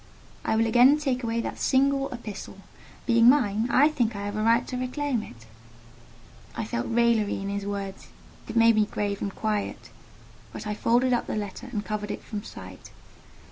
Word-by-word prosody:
"I - - 0
will 225 +1 +3
again 245 +5 +6
take 265 -4 -1
away 230 0 -1
that - - -5
single 275 +1 +2
epistle: 230 -6 -8 0.5
being 235 -1 +6
mine, 235 -4 +2
I 285 +5 +5
think 240 -8 0
I 200 0 -4
have 205 0 -4
a 215 - -1
right 230 +2 +3
to 255 - -5
reclaim 255 0 -1
it." 115 - -12 1.1
I - - -3
felt 120 - -3
raillery 230 -3 +2
in 195 0 -4
his 200 0 -3
words: 200 -1 -5 0.4
it - - -7
made 230 -1 +5
me 210 -1 +3
grave 205 -1 -3
and 200 - -3
quiet; 215 -2 -3 0.6
but - - -8
I 210 - -2
folded 240 +4 +2
up 240 - 0
the - - -3
letter 210 +4 -5
and 210 -4 -3
covered 210 -1 -3
it - - -5
from 210 -2 -6
sight. - - -11
230 Hz, 185 wpm, -26 LUFS, 205-250 Hz, 1.1 s, again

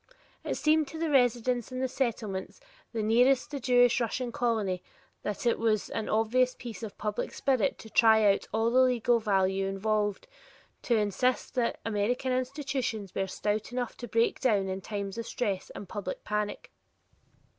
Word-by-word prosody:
It - - -2
seemed 310 -1 +2
to 320 - -8
the 320 -1 -1
residents 245 -2 +2
in 255 - -4
the 260 - +1
Settlements 225 -7 -3 0.3
nearest 245 +6 +3
the 290 - -3
Russian 245 -1 +2
Jewish - - -7
colony 215 -7 0 0.4
that 210 +3 -4
it 235 - +2
was 215 -2 +1
an 220 - -3
obvious 250 +4 +2
piece 230 -6 -8
of 220 -3 -7
public 210 -1 -3
spirit 270 0 +1
to - - -11
try 220 -5 +6
out - - -5
all 225 +1 +1
the 255 - +4
legal 245 -2 +3
value 195 -2 +1
involved, 205 - -1 0.6
to 240 - +1
insist 220 +4 0
that 245 -2 0
American 225 +4 0
institutions 255 - -2
were 195 - -1
stout 210 +4 -2
enough 245 -1 -3
to 240 - -7
break 230 +1 +1
down 205 -6 +2
in 190 0 -3
times 200 +1 -4
of 230 - -5
stress 200 -6 -2
and 200 - -7
public 195 -1 -5
panic. 210 0 -3
230 Hz, 165 wpm, -29 LUFS, 205-250 Hz, 0.6 s, try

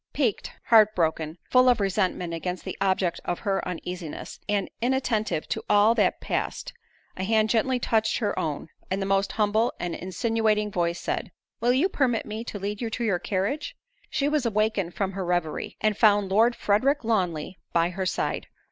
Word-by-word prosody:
Piqued—heart 220 -3 +3
broken—full 165 +9 +2
of 245 -2 +3
resentment 185 -3 0
against 180 +2 -4
the - - -4
object 185 -3 +1
of 175 - -2
her 195 -1 0
uneasiness, 180 -2 -6
and 205 -2 +1
inattentive 235 - 0
to - - -2
all 205 +2 +5
that - - +2
passed, - - -3 0.4
a 185 - -2
hand 220 +1 +2
gently 250 +3 +2
touched 220 -2 +1
her 210 -4 -1
own; 150 -1 -3 0.2
and 190 - -1
the 195 - -1
most 195 0 +1
humble 215 +2 +2
and 175 -1 -3
insinuating 210 +2 0
voice 170 -2 0
said, - - -3 0.3
"Will 240 - +3
you 280 +9 +3
permit 260 -10 0
me 215 +2 -5
to 215 - -5
lead 205 +2 -4
you 230 - -1
to 235 +2 -3
your 195 -6 +1
carriage?" 205 +13 -2 0.3
She 285 -2 0
was 295 -2 +1
awakened 215 -5 0
from 195 -1 -1
her 195 0 -4
revery, 175 -3 -2
and 215 -1 +2
found 205 -2 +4
Lord 225 +5 +4
Frederick 255 +8 +2
Lawnly 180 -7 -1
by 170 0 +2
her 190 +1 -2
side. - - -2
205 Hz, 175 wpm, -26 LUFS, 185-225 Hz, 0.4 s, all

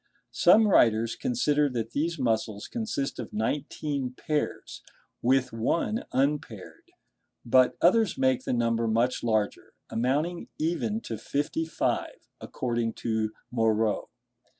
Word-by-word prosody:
Some 220 -1 +6
writers 115 - +3
consider 150 - +1
that 115 -3 -3
these 165 +5 -1
muscles 110 -5 -1
consist 220 - -3
of 120 - -6
nineteen 135 +3 -2
pairs, 150 +3 -3 0.4
with 130 0 +2
one 165 - -1
unpaired; 135 -7 -2 0.6
but 130 +1 +4
others 210 +2 +4
make 130 -1 +2
the - - -2
number 115 -1 +1
much 115 +3 +1
larger, 110 -3 -1 0.2
amounting 145 +9 -1
even 190 +8 -1
to 115 - -6
fifty 145 +6 -2
five, - - -2
according 120 -2 -2
to 110 -1 -2 0.2
Moreau. 110 -2 +1
125 Hz, 115 wpm, -27 LUFS, 115-150 Hz, 0.6 s, Some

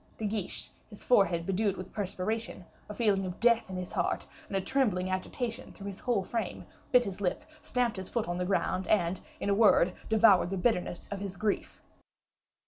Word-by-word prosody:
De 220 - -3
Guiche, 205 -2 -3 0.2
his 210 - -11
forehead 175 -8 +3
bedewed 195 +1 0
with 185 - -8
perspiration, 205 0 -3 0.2
a - - -4
feeling 205 -4 +2
of 180 -1 -5
death 235 -3 +3
in 190 - -5
his 180 -1 -5
heart, - - -1 0.2
and 195 - -1
a - - +2
trembling 190 -6 0
agitation 230 +5 -3
through 200 - -11
his 200 -1 -6
whole 235 -6 0
frame, 220 -1 -3 0.3
bit 250 -1 +6
his 195 0 -5
lip, 180 -3 -1 0.2
stamped 245 -4 0
his 190 -1 -5
foot 235 -5 -1
on 175 0 -2
the 180 - -1
ground, 190 0 0
and, 180 -3 +2 0.2
in - - -3
a 200 - +3
word, 200 -4 +5 0.2
devoured 215 -5 +5
the 195 - -2
bitterness 180 -4 0
of 200 - -3
his 195 -1 -5
grief. 210 0 -2
200 Hz, 195 wpm, -30 LUFS, 185-220 Hz, 0.3 s, bit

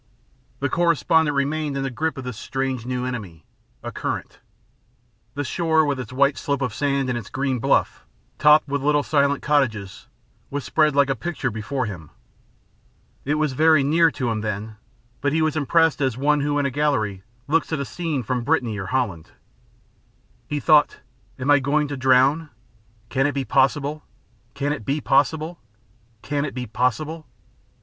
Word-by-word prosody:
The 140 - +1
correspondent 160 -1 +2
remained 145 0 -1
in 135 - -2
the 135 - -3
grip 160 +5 -2
of 130 - -5
this 125 -2 -5
strange 130 0 -3
new 125 0 -2
enemy 100 - -6 0.4
a - - -5
current. - - -5 1.0
The 145 - -2
shore, 160 +2 +1
with 140 -2 -1
its 125 -3 -6
white 140 +2 +2
slope 140 -1 -1
of 125 -4 -2
sand 140 +1 0
and 125 - -1
its 120 -5 -6
green 135 -2 -1
bluff, - - +1 0.4
topped 150 0 +6
with 140 0 -2
little 145 +1 +2
silent 140 -1 +1
cottages, 110 -10 0 0.4
was 140 0 -4
spread 155 -2 +2
like 140 -1 +4
a - - 0
picture 150 -5 -3
before 115 +5 -3
him. 90 -8 -8 1.2
It 145 +2 +1
was 155 -3 0
very 155 +1 +4
near 165 +4 +4
to 125 -6 -2
him 110 -1 -2
then, 105 +1 -4 0.4
but 140 +1 0
he 160 - +2
was 155 -1 0
impressed 160 +1 +2
as 130 -4 0
one 145 +2 +2
who 145 0 0
in 145 - +1
a 140 - 0
gallery 125 -9 0 0.3
looks 165 +3 +1
at 160 - -1
a 140 - -2
scene 160 -4 -3
from 125 +1 -2
Brittany 120 -7 0
or 95 - -5
Holland. 105 -10 -2 1.2
He 150 - -2
thought: 150 -1 +4 0.4
"I 130 - -6
am 145 +1 +4
going 150 +2 +1
to 145 - -3
drown? 130 +4 +3 0.6
Can 135 +1 +1
it 145 - -2
be 135 -1 -2
possible 145 +5 +1 0.5
Can 145 +1 -1
it 145 - -6
be 140 +7 -1
possible? 155 +4 +1 0.6
Can 145 0 -1
it 145 - -5
be 125 -1 -3
possible?" 125 +8 -2
140 Hz, 175 wpm, -23 LUFS, 125-150 Hz, 1.2 s, topped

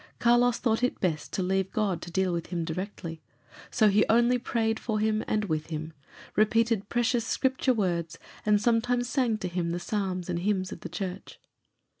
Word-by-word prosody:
Carlos 240 0 +4
thought 225 -1 +1
it 250 - 0
best 160 -5 -1
to 190 - -1
leave 190 +1 0
God 205 -5 0
to - - -7
deal 185 +1 0
with 170 -1 -3
him 170 -2 -2
directly, 170 -1 -5 0.5
so 220 -3 +3
he 205 +1 +4
only 240 +2 +4
prayed 225 -2 0
for 220 -2 -2
him 215 0 +1
and 215 -1 0
with 155 -4 -2
him, 160 0 -5 0.4
repeated 220 -1 +2
precious 240 0 +1
Scripture 260 +2 +1
words, 170 -5 -1 0.3
and 210 -1 +3
sometimes 240 +2 +1
sang 245 -4 +1
to 190 - -4
him 175 -1 -2
the 175 - -2
psalms 185 -1 -2
and 175 -2 -1
hymns 185 0 0
of - - -7
the 175 - -7
Church. 185 +2 -6
205 Hz, 185 wpm, -28 LUFS, 180-230 Hz, 0.5 s, Carlos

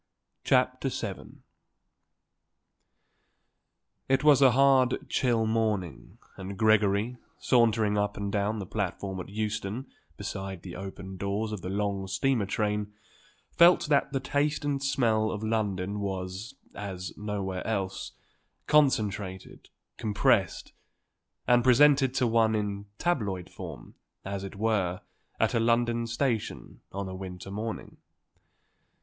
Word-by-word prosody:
CHAPTER - - +2
VII - - -6 2.7
It 135 +1 +3
was 145 -2 +6
a 135 - +8
hard, 135 -1 +3
chill 120 -3 +1
morning 110 -7 -2 0.2
and 95 0 -7
Gregory, 110 +1 +3 0.2
sauntering 110 -4 +3
up 105 0 -1
and 100 0 -3
down 105 +2 0
the 100 - -4
platform 95 -1 -3
at 90 - -7
Euston 110 +3 -3 0.3
beside 95 -2 -5
the 90 -2 -8
open 95 0 -7
doors 100 +3 -2
of 105 -3 -5
the 90 - -5
long 100 -1 -2
steamer 105 +3 +1
train, 105 0 -1 0.6
felt 170 -2 +5
that 140 -2 +3
the 135 - 0
taste 145 +3 0
and 140 -1 -1
smell 115 -6 +2
of 105 0 -4
London 105 -3 -1
was, 95 +4 -4 0.2
as 95 -3 -6
nowhere 100 -3 -3
else, 100 -4 -3 0.5
concentrated, 105 -10 +1 0.3
compressed, 105 -3 +1 0.7
and 120 0 +5
presented 135 +1 +5
to 130 - +2
one 115 -1 +3
in 100 -1 -3
tabloid 105 - -1
form, - - -9 0.3
as 100 0 -4
it 100 - -7
were, 100 -4 0 0.4
at - - +2
a - - +2
London 115 0 +1
station 120 -1 -2
on 100 0 -4
a 95 - -6
winter 95 0 -7
morning. 110 +2 -5
105 Hz, 120 wpm, -28 LUFS, 95-120 Hz, 2.7 s, a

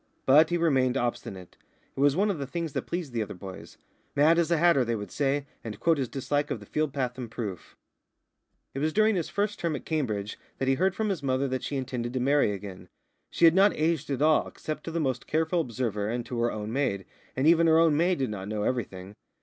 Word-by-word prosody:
But 150 +4 +6
he 175 - +1
remained 135 -6 +2
obstinate. 100 -7 -4 0.4
It - - -8
was 140 0 +4
one 205 +3 +2
of 175 - -4
the 140 - -4
things 165 0 -4
that - - -3
pleased 170 -7 -4
the 115 - -1
other 105 -2 -5
boys. 95 +1 -10 0.4
"Mad 155 +4 +5
as 170 - +1
a 170 - +3
hatter," 165 -5 +4
they 115 -1 -1
would 105 -2 -6
say, 140 0 0 0.2
and 110 -2 -7
quote 165 +3 +2
his 130 -3 -2
dislike 145 +2 -1
of 115 - -3
the 105 - -12
field 155 +6 -1
path 130 -2 -3
in 120 -3 -5
proof. 105 -6 -7 1.0
It 135 - -4
was 155 +2 0
during 215 0 +3
his 170 -4 -2
first 205 +1 -1
term 165 -3 -1
at - - -7
Cambridge 110 -10 -2 0.2
that 135 - -2
he 135 - +4
heard 190 +6 +1
from 220 0 -1
his 190 -6 -2
mother 135 0 0
that 130 -1 -2
she 145 - -3
intended 125 -2 -4
to 130 - -1
marry 140 -3 +3
again. 95 -3 -8 0.4
She 170 - +3
had 165 - +7
not 195 +3 +4
aged 160 -2 0
at 140 +1 0
all, 155 0 +4
except 155 - -6
to 165 - -4
the 165 - -2
most 130 -6 -2
careful 160 +2 +1
observer 115 -6 -2
and 120 +1 -3
to 120 - -4
her 120 0 +1
own 110 +1 -5
maid, 110 -9 -1 0.3
and 130 - 0
even 165 +1 +5
her 160 0 +5
own 165 -2 +4
maid 175 +3 +2
did 130 -5 -1
not 95 -2 -6
know 105 0 -2
everything. 100 -6 -3
135 Hz, 240 wpm, -27 LUFS, 115-160 Hz, 1.0 s, had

